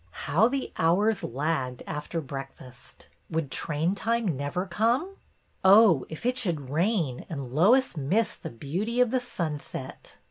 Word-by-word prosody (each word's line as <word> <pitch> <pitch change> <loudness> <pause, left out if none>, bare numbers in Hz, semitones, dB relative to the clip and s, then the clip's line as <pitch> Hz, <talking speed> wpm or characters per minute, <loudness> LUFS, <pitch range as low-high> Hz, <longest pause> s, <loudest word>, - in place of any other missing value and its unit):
How 170 +10 +4
the 270 +1 -3
hours 195 +6 +2
lagged, 130 -1 -2
after 155 +2 -4
breakfast! 135 -2 -10 0.2
Would 160 -4 -2
train 160 +3 -1
time 220 -3 0
never 145 +7 -2
come? 235 - 0 0.5
Oh, 190 - +6
if 160 +7 -8
it 250 +1 +1
should 160 - -2
rain 165 - 0
and 140 -6 -6
Lois 220 - +4
miss 175 +10 0
the - - -8
beauty 180 - -3
of 250 -2 +4
the 255 - +1
sunset! 150 - -6
165 Hz, 140 wpm, -27 LUFS, 145-225 Hz, 0.5 s, Oh